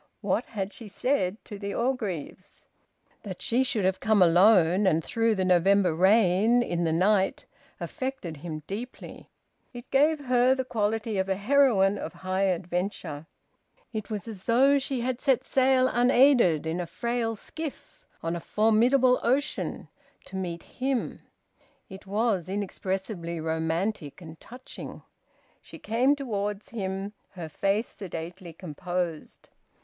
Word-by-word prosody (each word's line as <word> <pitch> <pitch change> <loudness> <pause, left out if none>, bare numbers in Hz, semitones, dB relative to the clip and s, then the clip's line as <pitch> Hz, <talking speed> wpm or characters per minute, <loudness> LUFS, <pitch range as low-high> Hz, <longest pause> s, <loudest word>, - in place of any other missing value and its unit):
What - - -1
had 200 -2 -4
she 225 - -9
said 205 -3 -1
to 205 -2 -8
the 200 0 -4
Orgreaves? 210 - -4 0.6
That 190 -4 -7
she 245 +3 +1
should 235 -7 -1
have 190 0 +1
come 220 -1 +2
alone, 185 +1 +5
and 165 -2 +2
through 225 +3 +1
the 190 -1 0
November 185 0 +4
rain, 205 +5 +4
in 175 -5 -1
the 160 - +1
night, 190 +3 +2 0.3
affected 260 - -5
him 155 0 -7
deeply. 230 +8 -8 0.4
It 240 0 -10
gave 290 +1 +3
her 250 +1 +4
the 260 -1 -3
quality 220 -2 -1
of 190 0 -1
a 190 - +1
heroine 205 -3 +3
of - - -6
high 190 +1 +1
adventure. 180 -4 -3 0.7
It 215 -2 -5
was 215 0 -5
as 205 -4 -9
though 270 +4 +4
she 265 -2 -2
had 250 0 -2
set 265 -3 +2
sail 260 -1 +3
unaided, 245 - +4
in 160 +2 -2
a 175 - -3
frail 230 +5 -2
skiff, 315 +7 -8 0.2
on 165 +1 -1
a - - -3
formidable 240 +7 +3
ocean, 275 +5 -1 0.4
to - - -10
meet 175 -3 -4
him. 260 -1 -3 0.7
It 190 +1 -11
was 200 -4 0
inexpressibly 190 -3 -3
romantic 160 +1 -2
and 160 -2 -11
touching. 250 +2 -10 0.6
She - - -12
came 250 +6 +2
towards 210 -6 -4
him, 195 -2 -4 0.2
her 175 -4 -6
face 200 +8 0
sedately 175 -1 -8
composed. 175 0 -5
200 Hz, 140 wpm, -27 LUFS, 180-240 Hz, 0.7 s, alone